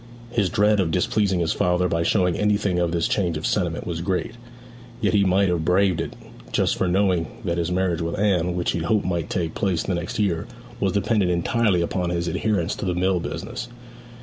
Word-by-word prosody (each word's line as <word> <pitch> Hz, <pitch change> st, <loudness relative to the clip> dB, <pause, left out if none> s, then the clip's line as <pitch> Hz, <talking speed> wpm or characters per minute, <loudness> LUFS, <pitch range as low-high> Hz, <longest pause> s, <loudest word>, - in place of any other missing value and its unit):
His 100 Hz, -5 st, +1 dB
dread 105 Hz, -1 st, +3 dB
of 90 Hz, -4 st, +1 dB
displeasing 95 Hz, +2 st, +1 dB
his 80 Hz, -, +1 dB
father 90 Hz, 0 st, +1 dB
by 85 Hz, -1 st, 0 dB
showing 90 Hz, 0 st, +2 dB
anything 100 Hz, -3 st, +1 dB
of 85 Hz, -1 st, +1 dB
this 85 Hz, -1 st, +1 dB
change 90 Hz, -6 st, 0 dB
of 75 Hz, -, -5 dB
sentiment 85 Hz, -4 st, -1 dB
was 85 Hz, -2 st, -3 dB
great; 90 Hz, +1 st, -1 dB, 0.7 s
yet -, -, +1 dB
he 100 Hz, -1 st, +4 dB
might 95 Hz, +1 st, +3 dB
have 85 Hz, -2 st, 0 dB
braved 90 Hz, 0 st, +2 dB
it -, -, -5 dB, 0.4 s
but -, -, +2 dB
for 95 Hz, -, 0 dB
knowing 90 Hz, -2 st, +2 dB, 0.2 s
that 85 Hz, 0 st, 0 dB
his 85 Hz, +1 st, -1 dB
marriage 90 Hz, -2 st, 0 dB
with 85 Hz, 0 st, -2 dB
Anne, 90 Hz, -4 st, +1 dB
which 90 Hz, -1 st, 0 dB
he -, -, -2 dB
hoped 100 Hz, +6 st, +1 dB
might 85 Hz, -3 st, -2 dB
take 85 Hz, -3 st, -2 dB
place 90 Hz, -5 st, 0 dB
the 95 Hz, -, -2 dB
next 85 Hz, +5 st, -3 dB
year, 95 Hz, -6 st, 0 dB, 0.3 s
was 95 Hz, -, +1 dB
dependent 100 Hz, -1 st, +1 dB
entirely 90 Hz, +2 st, +1 dB
upon 90 Hz, +1 st, -1 dB
his 85 Hz, 0 st, -1 dB
adherence 90 Hz, +1 st, 0 dB
to -, -, -4 dB
the 90 Hz, -1 st, 0 dB
mill 90 Hz, 0 st, +1 dB
business. 110 Hz, +9 st, -5 dB
90 Hz, 205 wpm, -23 LUFS, 85-100 Hz, 0.7 s, he